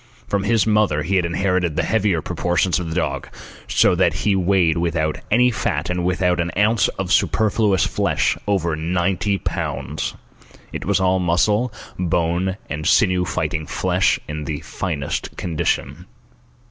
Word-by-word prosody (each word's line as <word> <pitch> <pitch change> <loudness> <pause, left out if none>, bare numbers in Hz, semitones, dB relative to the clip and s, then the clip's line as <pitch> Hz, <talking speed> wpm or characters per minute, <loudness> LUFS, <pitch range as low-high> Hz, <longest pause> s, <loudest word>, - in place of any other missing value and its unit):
From 100 -1 -1
his 110 -1 +2
mother 105 -8 +2
he 95 +5 +1
had 90 - +1
inherited 90 -1 0
the - - +1
heavier 100 -7 +1
proportions 90 0 0
of 85 -2 -4
the 80 - -4
dog, 90 - -2 0.4
so - - +4
that - - +2
he 105 -2 +3
weighed, 90 -3 +2
without 80 -3 -1
any 125 +3 +4
fat 80 -6 -2
and 90 0 -1
without 90 0 +1
an 85 0 -1
ounce 105 0 +3
of 95 -1 -1
superfluous 105 -3 +2
flesh, - - 0
over 85 -6 +1
ninety 90 +5 0
pounds. - - -3 0.6
It - - -5
was 100 +1 +2
all 95 0 +2
muscle, 105 +7 +1 0.3
bone, 90 +2 0
and 75 +1 -4
sinew 90 -6 +3
fighting 80 -3 -2
flesh - - +1
in 75 0 -5
the 75 -2 -4
finest 80 -8 -4
condition. 80 0 -2
90 Hz, 150 wpm, -21 LUFS, 85-100 Hz, 0.6 s, so